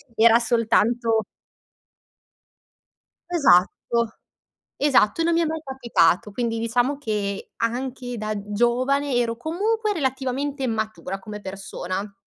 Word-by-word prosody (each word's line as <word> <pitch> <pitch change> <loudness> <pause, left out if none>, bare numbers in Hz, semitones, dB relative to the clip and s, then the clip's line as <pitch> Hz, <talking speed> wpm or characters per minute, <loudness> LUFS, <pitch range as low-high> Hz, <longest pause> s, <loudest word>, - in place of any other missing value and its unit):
era 230 +1 +6
soltanto 230 -1 +2 2.1
Esatto, 235 - +2 0.6
esatto 275 -3 +3
e - - +2
non 340 - +2
mi 335 - +3
è - - +2
mai 320 +1 -3
capitato, 235 - +1
quindi 230 +1 -2
diciamo 245 +5 0
che 205 -6 -3
anche 245 +1 -3
da 215 0 -2 0.2
giovane 255 +5 +1
ero 235 -1 +1
comunque 420 - -1
relativamente 270 -2 -2
matura 220 -4 -3
come 210 +1 -8
persona. 195 0 -5
235 Hz, 105 wpm, -23 LUFS, 215-270 Hz, 2.1 s, era